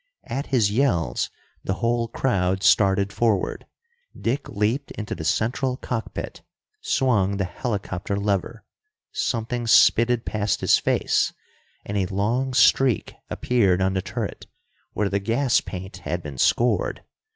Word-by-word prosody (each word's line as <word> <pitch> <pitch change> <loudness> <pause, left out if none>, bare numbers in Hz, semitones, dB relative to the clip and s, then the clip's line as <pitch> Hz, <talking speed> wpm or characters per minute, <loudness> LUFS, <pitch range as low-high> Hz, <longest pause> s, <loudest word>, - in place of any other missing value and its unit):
At 135 +3 -4
his 115 -7 +2
yells, 105 - +1 0.3
the 95 - -1
whole 115 +1 0
crowd 95 -6 0
started 100 -1 +3
forward. 110 -5 0 0.5
Dick 130 +5 -2
leaped 110 +7 -1
into 105 -1 -4
the 80 - -6
central 125 - 0
cockpit, 120 -4 -5 0.4
swung 115 - +1
the 100 - 0
helicopter 100 -2 -3
lever. 100 +3 -2 0.5
Something 120 0 -2
spitted 115 +1 +5
past 105 -1 -1
his - - +4
face, - - +1 0.5
and 100 - -3
a 95 -2 +1
long 120 +8 -1
streak 125 -2 +3 0.2
appeared 100 -7 +2
on 95 0 +1
the 95 - 0
turret, - - -5 0.5
where 105 0 0
the 100 0 0
gas 120 +6 +1
paint 95 0 -7
had 85 +3 -4
been 70 -4 -8
scored. 120 - +1
105 Hz, 130 wpm, -24 LUFS, 95-120 Hz, 0.5 s, spitted